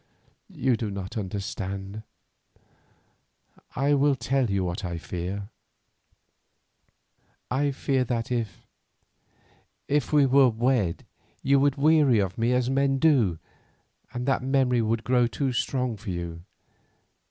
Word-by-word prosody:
You 125 -2 +1
do 110 -1 -3
not 100 -1 -6
understand. 100 0 -5 1.7
I 140 +3 +2
will 140 0 +3
tell 130 0 0
you 100 -1 0
what 90 +4 -3
I 85 -2 -3
fear. 95 +4 -5 2.0
I 140 +3 +1
fear 135 -1 0
that 115 0 -2
if—if 125 +4 -6
we 145 -2 +5
were 135 0 +5
wed, 115 -6 0 0.4
you 140 0 +4
would 140 0 +2
weary 145 -4 +4
of 95 -3 0
me 115 +1 +1
as 125 -1 +1
men 135 +1 +1
do, 130 - +3 0.7
and 125 0 -4
that 135 -1 +1
memory 130 -2 +2
would 115 +1 -1
grow 125 0 +3
too 130 +2 -2
strong 125 -1 -1
for 105 +1 -8
you. 85 -1 -5
120 Hz, 120 wpm, -26 LUFS, 100-135 Hz, 2.0 s, we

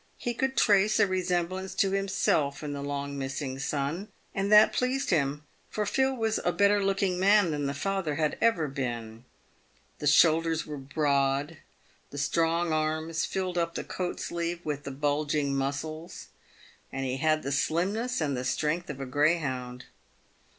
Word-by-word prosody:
He 240 - -3
could 265 +2 -1
trace 205 0 +4
a - - +6
resemblance 185 0 -2
to 195 - +2
himself 190 -7 0
in 145 -1 -4
the 140 - -5
long 140 0 -4
missing 135 0 -4
son, 150 +7 -2 0.3
and 195 0 -1
that 210 0 +7
pleased 260 +1 0
him, 145 -3 +1 0.3
for 210 - -2
Phil 265 +4 +1
was 225 -2 0
a 175 - +2
better 200 +3 +3
looking 195 -2 0
man 200 -2 +4
than 145 -2 -1
the 140 - -3
father 190 -2 -1
had 155 0 0
ever 195 -10 +3
been. 120 -4 -5 0.7
The 150 - -2
shoulders 160 +2 +4
were 150 -2 -6
broad, 140 +1 0 0.5
the 145 - -9
strong 165 +3 +1
arms 155 +1 -1
filled 185 -2 -2
up 170 0 -1
the - - -3
coat 180 -1 -4
sleeve 170 0 -3
with 145 -2 -3
the - - -4
bulging 145 0 0
muscles, 150 +4 -4 0.6
and 135 0 -3
he 130 0 -2
had 155 +2 +1
the 140 - -3
slimness 190 - 0
and 145 -3 0
the 125 - -3
strength 150 +7 -1
of 140 -2 -6
a 135 - -4
greyhound. 130 -4 0
155 Hz, 165 wpm, -28 LUFS, 140-190 Hz, 0.7 s, that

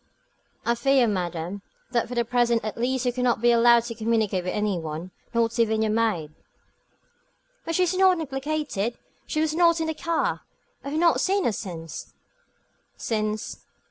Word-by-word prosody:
"I 235 - +3
fear, 270 +1 +3
madame, 180 -2 -3 0.3
that 235 -2 +1
for 245 - -6
the 235 -1 +1
present 235 -1 +1
at 215 - -3
least 255 +2 -1
you 245 - +1
cannot 250 -2 +1
be 240 +1 +4
allowed 235 0 +5
to 235 0 -5
communicate 220 -4 0
with 180 - -2
any 210 -4 0
one, 160 +3 -6 0.2
not 230 0 0
even 220 -1 +2
with - - +3
your 215 - +1
maid." 210 -9 0 1.3
"But 330 - -2
she 365 - +3
is 360 0 +1
not 370 -1 +4
implicated; 270 -6 -2 0.3
she 310 - -1
was 315 -1 +1
not 335 0 +4
in 320 - 0
the 320 - -1
car. 335 +1 -1 0.4
I 280 - -5
have 305 +2 -1
not 340 -1 +4
seen 390 +1 +1
her 235 - +2
since 165 -6 -7 0.4
" - - -43
"Since?" 215 -1 -2
235 Hz, 180 wpm, -25 LUFS, 210-280 Hz, 1.3 s, allowed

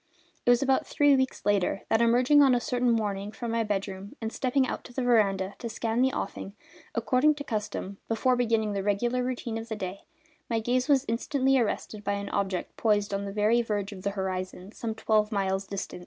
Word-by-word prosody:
It - - +6
was 245 +2 +5
about 270 -1 +2
three 290 -1 +4
weeks 260 -1 -1
later 200 -1 +1
that, 225 - +3
emerging 250 +5 +5
on 270 -3 +6
a - - +2
certain 245 0 0
morning 210 -3 -1
from 235 +1 -5
my 230 0 +1
bedroom, 195 -1 -4
and 225 0 -4
stepping 260 +1 +1
out - - -4
to 245 - -12
the 260 - -2
veranda 200 -5 +2
to 235 - -5
scan 225 +1 -1
the 265 +1 +3
offing, 200 -2 -5 0.4
according 255 +6 +3
to 290 - -6
custom, 210 -5 -4
before 250 +3 +2
beginning 225 -3 +1
the 200 - -1
regular 235 +5 0
routine 240 -3 -3
of 225 +1 -9
the 220 - -2
day, 195 -1 -6 0.4
my 230 -1 +1
gaze 250 +3 0
was 275 -1 +4
instantly 265 +3 +1
arrested 215 -2 -2
by 200 - 0
an 200 0 -4
object 190 -2 -2
poised 205 -2 +1
on 200 0 -2
the 200 - -4
very 215 +3 +3
verge 205 -3 -2
of 195 -2 -9
the 200 - -1
horizon, 185 0 -4
some 225 -1 -4
twelve 215 -1 +1
miles 195 -1 -1
distant. 195 -2 -5
220 Hz, 210 wpm, -28 LUFS, 200-245 Hz, 0.4 s, It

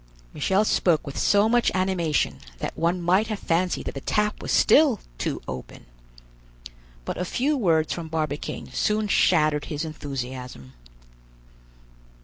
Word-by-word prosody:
Michel 195 +3 +1
spoke 170 -6 +2
with 140 - -7
so 205 +1 +3
much 240 +1 +3
animation 185 -5 0 0.2
that - - -5
one 170 +2 0
might 185 +5 +2
have 215 -2 -3
fancied 180 0 0
that - - -4
the 135 - -6
tap 210 +6 0
was - - -4
still 280 -9 +5 0.2
too - - -3
open. 65 -1 -8 1.2
But - - -4
a - - 0
few 270 +11 0
words 165 - +2
from 170 -2 -6
Barbicane 155 -2 -4
soon 215 0 0
shattered 155 -6 +3
his 150 +1 -4
enthusiasm. 130 - -7
170 Hz, 135 wpm, -25 LUFS, 150-205 Hz, 1.2 s, still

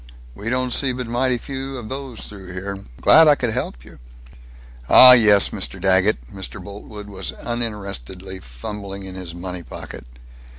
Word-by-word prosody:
We 105 - -6
don't 125 0 -1
see 135 -2 +2
but 125 0 -5
mighty 125 +2 0
few 135 +1 -6
of 120 -3 -8
those 130 -2 -7
through 95 -3 -9
here. 100 +1 -6 0.2
Glad 160 0 +7
I 150 - +6
could 120 -4 -1
help - - -4
you." - - -14 0.9
"Ah 130 - +10
yes, 105 -5 +7
Mr. - - -5
Daggett." 95 - +1
Mr. 95 -1 -7
Boltwood 105 +1 -10
was 95 -2 -5
uninterestedly 100 - -5
fumbling 95 - -8
in 95 -1 -9
his 90 -2 -7
money 90 0 -6
pocket. 75 - -10
100 Hz, 160 wpm, -21 LUFS, 95-125 Hz, 0.9 s, Ah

